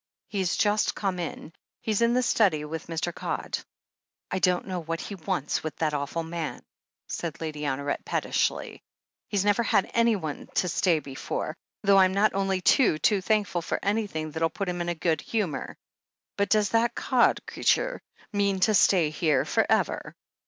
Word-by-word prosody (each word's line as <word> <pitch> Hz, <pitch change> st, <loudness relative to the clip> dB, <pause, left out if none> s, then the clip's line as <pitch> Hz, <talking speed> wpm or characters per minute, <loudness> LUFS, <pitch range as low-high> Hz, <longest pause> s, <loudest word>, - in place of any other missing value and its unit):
"He's 190 Hz, -4 st, -1 dB
just 210 Hz, 0 st, +2 dB
come 190 Hz, -3 st, -2 dB
in. 165 Hz, -1 st, -6 dB, 0.3 s
He's 215 Hz, 0 st, -1 dB
in 235 Hz, +1 st, +3 dB
the 255 Hz, -, +3 dB
study 180 Hz, -12 st, +2 dB
with 160 Hz, +2 st, -6 dB
Mr. 170 Hz, +1 st, -2 dB
Codd." -, -, -3 dB, 0.7 s
"I 190 Hz, -, 0 dB
don't 180 Hz, 0 st, +2 dB
know 185 Hz, -2 st, -3 dB
what 165 Hz, +1 st, -3 dB
he 205 Hz, -, -6 dB
wants 155 Hz, -5 st, -2 dB
with 155 Hz, -3 st, -5 dB
that 155 Hz, -2 st, 0 dB
awful 145 Hz, +3 st, -2 dB
man," 165 Hz, -1 st, -5 dB, 0.4 s
said 165 Hz, -2 st, -4 dB
Lady 150 Hz, -2 st, -4 dB
Honoret 140 Hz, +1 st, -2 dB
pettishly. -, -, -1 dB, 0.5 s
"He's 200 Hz, -2 st, 0 dB
never 205 Hz, +2 st, +3 dB
had 215 Hz, -4 st, +1 dB
anyone 215 Hz, -10 st, 0 dB
to 180 Hz, -, +2 dB
stay 175 Hz, 0 st, +2 dB
before 135 Hz, -3 st, -4 dB, 0.2 s
— -, -, -18 dB
^though 200 Hz, 0 st, +6 dB
I'm 190 Hz, 0 st, +4 dB, 0.2 s
only 195 Hz, -1 st, 0 dB
too, 205 Hz, -, +4 dB
too 195 Hz, +6 st, +2 dB
thankful 205 Hz, -4 st, +1 dB
for -, -, -2 dB
anything 200 Hz, -7 st, -1 dB
that'll 165 Hz, +1 st, 0 dB
put 195 Hz, +3 st, -4 dB
him 175 Hz, 0 st, -2 dB
in 175 Hz, -, -2 dB
a 175 Hz, -, -1 dB
good 160 Hz, 0 st, 0 dB
humour. 205 Hz, -10 st, -3 dB, 0.6 s
But 200 Hz, 0 st, 0 dB
does 210 Hz, -2 st, +3 dB
this 230 Hz, +1 st, +3 dB
Codd 255 Hz, -2 st, +3 dB
c'eature -, -, +1 dB, 0.3 s
mean 200 Hz, -1 st, +1 dB
to 215 Hz, -, +4 dB
stay 175 Hz, -6 st, +4 dB
here 155 Hz, -1 st, +1 dB
for -, -, +1 dB
ever?" -, -, 0 dB
180 Hz, 175 wpm, -27 LUFS, 160-205 Hz, 0.7 s, ^though